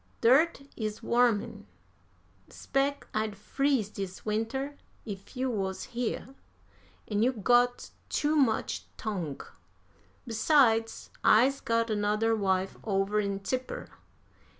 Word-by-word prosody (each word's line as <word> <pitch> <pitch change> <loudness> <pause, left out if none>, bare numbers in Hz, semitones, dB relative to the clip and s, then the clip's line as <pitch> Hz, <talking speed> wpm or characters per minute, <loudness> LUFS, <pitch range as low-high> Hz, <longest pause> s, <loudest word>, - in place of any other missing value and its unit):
Dirt 275 +5 +4
is 215 -1 -4
warmin'. 230 -3 +1 0.8
'Spec 280 +1 -1
I'd 215 -1 -1
freeze 265 +1 0
dis 195 -3 -7
winter 225 +7 -2 0.3
if 200 +2 -8
you 260 0 0
wuz 190 -4 -3
here. 245 +2 -3 0.7
An' 210 -1 0
you 245 +3 +4
got 245 +2 +2 0.2
too 300 +1 +1
much 260 -7 +1
tongue. 180 -10 -4 0.8
Besides, 225 -1 +2
I's 260 +6 +5
got 230 0 +1
anudder 215 +2 +1
wife 190 -2 0
over 200 0 +1
in 200 -1 -2
Tipper. 255 +6 -4
225 Hz, 105 wpm, -29 LUFS, 205-255 Hz, 0.8 s, I's